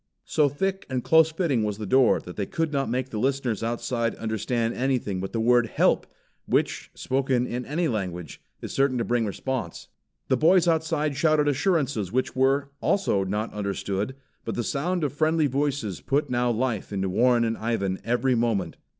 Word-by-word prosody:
So 150 -2 +2
thick 190 +7 -2
and 130 -2 -2
close 160 0 +5
fitting 155 - 0
was 105 -1 -2
the 105 - -5
door 130 +4 +4
that 90 - -10
they 100 -2 -3
could 165 -2 -2
not 135 -1 0
make 130 +2 -1
the 110 - -3
listeners 130 -3 0
outside 115 0 -1
understand 115 +1 -1
anything 125 -7 -1
but 95 - -4
the 115 - -2
word 120 +1 +4
"Help!" - - +2 0.4
which, - - 0
spoken 130 -2 0
in 125 0 -4
any 165 +4 0
language, 90 - -4 0.2
is - - -5
certain 135 -2 +2
to 115 - -1
bring 120 -2 +1
response. 115 -3 -4 0.4
The 130 - +2
boys 175 +4 +4
outside 160 -3 +1
shouted 155 -1 +3
assurances 140 - 0
which 130 +3 -1
were, 135 +2 +2
also 145 - +1
not 105 +4 -3
understood, 100 +3 -3 0.3
but - - -4
the 120 - -1
sound 170 +8 -1
of 145 - -1
friendly 155 +1 +2
voices 135 -7 -1
put 145 +1 0
now 120 0 +1
life 120 -3 -1
into 95 -1 -1
Warren 120 +5 +3
and 115 0 0
Ivan 100 -5 -2
every 125 +3 +1
moment. 115 -4 0
125 Hz, 180 wpm, -25 LUFS, 110-145 Hz, 0.4 s, close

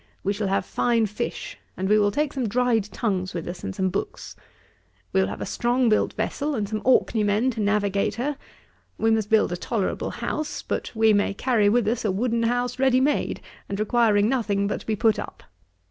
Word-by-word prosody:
We 200 - +1
shall 205 0 -2
have 190 -1 0
fine 235 -2 +1
fish, 210 0 -5 0.2
and 190 - -1
we 210 +2 +4
will 205 -1 +3
take 295 +6 -1
some 255 -5 -2
dried 240 -2 +2
tongues 195 -4 -2
with 170 - -4
us, 175 0 -7
and 95 - -4
some 190 - 0
books. - - -5 0.8
We 95 - +4
will 95 - +1
have 100 - -6
a - - -2
strong 245 0 +1
built 215 - +2
vessel, 285 +7 -2
and 210 -4 -1
some 215 0 -3
Orkney 240 -3 +3
men 210 +5 +2
to 225 - -7
navigate 205 -1 +1
her. 275 +6 -2 0.6
We 225 0 +2
must 220 -2 +1
build 220 -4 +3
a 175 - -2
tolerable 205 +1 -2
house: 310 0 -4
but - - -3
we 220 -1 +4
may 205 -1 +1
carry 220 -3 +2
with 230 0 +2
us 225 +2 0
a 215 - +1
wooden 230 +4 0
house 245 +2 0
ready 260 -1 +4
made, 285 +3 0 0.3
and 200 - -3
requiring 215 -1 +3
nothing 220 -6 0
but 200 - -2
to - - -16
be 220 - +1
put 220 0 +2
up. - - -8
220 Hz, 210 wpm, -24 LUFS, 200-245 Hz, 0.8 s, we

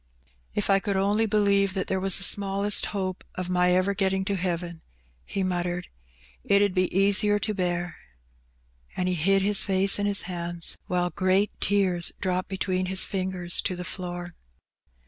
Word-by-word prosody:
" - - -38
If 205 -1 +1
I 195 - +4
could 200 0 -2
only 205 +3 +1
believe 200 -2 +2
that 190 - -1
there 190 - -1
was 190 -1 +3
the 195 - -2
smallest 200 +1 +2
hope 190 -2 -4
o' 185 - -2
my 180 0 +2
ever 185 +2 +1
getting 190 -1 0
to 200 - -1
heaven,^' 175 -2 -3 0.4
he 195 - -3
muttered, 180 -1 -3 0.5
"it 200 - +3
'ud 200 -2 +2
be 185 -1 +1
easier 200 +2 +3
to 215 +1 -2
bear/^ 175 -3 -2 1.0
And 180 - 0
he 185 - 0
hid 195 +4 +2
his 205 0 +4
face 195 +1 +2
in 205 - 0
his 200 0 +2
hands, 175 -1 -2
while 180 -1 -1
great 190 +4 +1
tears 185 -4 +2
dropped 185 -1 -2
between 185 -1 -2
his 190 0 +2
fingers 185 -2 -1
to 185 - -2
the 180 0 -6
floor. 175 -1 -6
190 Hz, 175 wpm, -26 LUFS, 180-200 Hz, 1.0 s, I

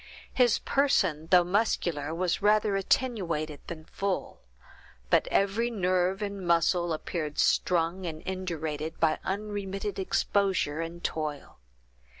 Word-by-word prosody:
His 245 -3 +4
person, 185 - +1
though 180 -1 +6
muscular, 175 -6 0
was 175 +1 -1
rather 210 0 +3
attenuated 180 - 0
than 155 -2 -7
full; 195 +2 -3 0.7
but - - +4
every 205 +4 +1
nerve 185 -2 0
and 200 -1 -4
muscle 170 0 +2
appeared 155 -1 -3
strung 175 +1 +1
and 155 -1 -6
indurated 160 -4 -4
by 160 -1 +2
unremitted 200 0 -3
exposure 190 -5 +1
and 170 +1 -6
toil. 150 - -4
180 Hz, 115 wpm, -28 LUFS, 160-200 Hz, 0.7 s, though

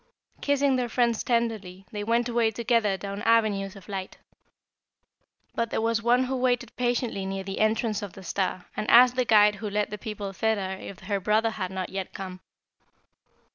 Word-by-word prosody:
Kissing 280 -2 +2
their 245 -1 -1
friends 235 -2 +1
tenderly, 220 -6 -1
they 210 -1 -4
went 235 +2 +1
away 235 -2 +2
together 220 -2 +1
down 200 +2 -6
avenues 210 -4 +2
of 195 - -13
light. 190 -2 -5 1.4
But 230 -1 -1
there - - -1
was 230 0 +1
one 240 +2 +3
who 260 +1 -2
waited 245 -2 0
patiently 240 -4 -1
near 195 0 -3
the 195 0 -5
entrance 215 0 +1
of 205 -3 -6
the 195 - -11
star 185 0 -2
and 215 - -3
asked 250 +1 +7
the 255 -1 +1
guide 210 -2 +5
who 210 0 -4
led 210 +1 -1
the 210 - -5
people 205 -2 -5
thither 205 -2 0
if 195 - -9
her 200 +1 -2
brother 215 +3 +2
had 190 -4 -4
not 190 -1 -4
yet 195 -1 -5
come. 185 -1 -7
215 Hz, 180 wpm, -26 LUFS, 195-235 Hz, 1.4 s, asked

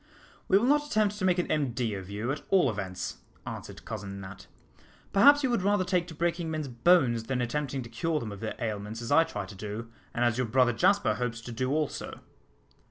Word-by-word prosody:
"We 195 - +5
will 215 - +2
not 295 +2 +3
attempt 210 -5 +1
to 185 - 0
make 180 -1 +3
an 180 - 0
MD 125 -7 0
of 95 -1 -7
you, 105 +5 -2
at 145 - -3
all 180 -10 +4
events," 95 -3 -5 0.3
answered - - -8
Cousin 100 0 -6
Nat. 95 0 -10 0.7
"Perhaps 285 +9 +7
you 260 - +2
would 235 - +1
rather 200 0 +2
take 180 -2 +1
to 165 - -9
breaking 170 +1 -1
men's 155 -2 -3
bones 120 -3 +3
than 130 +1 -1
attempting 135 +2 -2
to 120 - -10
cure 155 +7 -1
them 110 -5 -5
of 100 - -8
their 110 - -4
ailments, 110 0 -4
as 115 - -5
I 165 +3 +7
try 105 -10 -5
to 100 - -10
do, 105 +3 -6 0.2
and 120 0 0
as 120 0 +1
your 125 - +1
brother 125 +1 +3
Jasper 200 - +3
hopes 125 -2 -3
to 120 - -8
do 130 +3 -2
also." 150 0 -2
130 Hz, 220 wpm, -29 LUFS, 115-175 Hz, 0.7 s, Perhaps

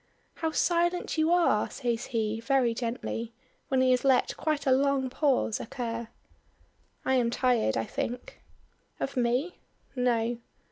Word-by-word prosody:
"How 325 - -1
silent 345 +2 +1
you 315 +2 +3
are," 340 -12 +3
says 240 -3 -2
he, 225 -2 -1
very 245 -1 +2
gently, 230 -1 -4 0.3
when 265 -1 +2
he 260 0 +4
has 250 - +2
let 265 -2 +3
quite 305 -2 -1
a 265 - +3
long 270 -1 +2
pause 265 -6 +1
occur. 230 0 -4 1.0
"I 265 - +2
am 245 -3 +3
tired, 240 - +1
I 115 - -1
think." 245 +1 -5 0.6
"Of 275 - -3
me?" 250 +8 0 0.4
"No." 240 -2 +1
250 Hz, 140 wpm, -28 LUFS, 235-275 Hz, 1.0 s, he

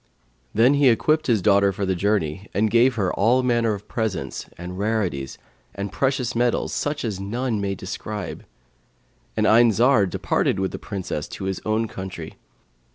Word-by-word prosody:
Then 120 +6 +4
he 140 -2 +5
equipped 155 +7 +2
his 110 -7 +2
daughter 100 -1 +4
for 100 +1 -3
the 95 - +1
journey 95 -1 -1
and 105 +2 +2
gave 120 +2 +4
her 100 -5 0
all 120 +6 +3
manner 120 -3 +2
of 100 - -11
presents 100 - -3
and 90 +2 -7
rarities 95 - -1 0.4
and 100 0 -4
precious 130 -2 0
metals, 120 0 +1
such 145 -2 -2
as 105 -4 -3
none 110 +2 -2
may 100 -1 -1
describe; 100 +1 -6 0.9
and - - +2
Ayn 115 +1 +6
Zar 115 -1 +4
departed 95 - 0
with 95 0 -1
the - - -6
Princess 95 -7 -4
to - - -8
his 95 0 -3
own 110 +1 +1
country. 95 -2 -8
105 Hz, 165 wpm, -23 LUFS, 95-120 Hz, 0.9 s, Ayn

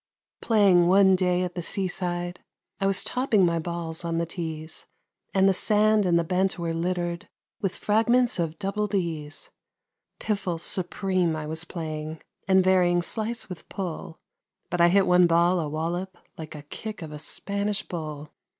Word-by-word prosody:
Playing 195 -6 +4
one 190 +1 +6
day 180 -1 +1
at 180 -1 -4
the 175 - -4
seaside, 175 -1 -2 0.4
I 195 - +1
was 195 0 +2
topping 235 -7 +2
my 170 -1 +1
balls 170 0 -3
on 165 -1 -2
the 170 - 0
tees, 160 -2 -5 0.4
And 190 0 +3
the 195 - +4
sand 210 +1 +3
and 170 -1 +3
the 170 - +2
bent 185 +3 0
were 170 -1 -2
littered 175 0 -2 0.3
with 195 -3 -1
fragments 230 +1 +2
of 165 -1 -2
double 205 +3 -2
D's; 165 -7 -3 0.7
Piffle 195 -5 -2
supreme 185 -1 +1
I 155 -1 -4
was 160 +2 -4
playing, 155 -2 -5 0.3
and 190 -1 +5
varying 180 -2 +3
"slice" 225 +4 -1
with 180 -3 -10
"pull," 170 -3 -6 0.5
But 175 0 +1
I 170 - +7
hit 195 +2 +4
one 180 0 +5
ball 170 +2 +3
a 155 -3 -2
wallop 175 +4 -3 0.2
like 160 -1 -8
a 145 - -9
kick 210 +6 -7
of 155 - -8
a 150 - -7
Spanish 200 +5 -1
bull. 155 -3 -6
175 Hz, 165 wpm, -26 LUFS, 165-195 Hz, 0.7 s, I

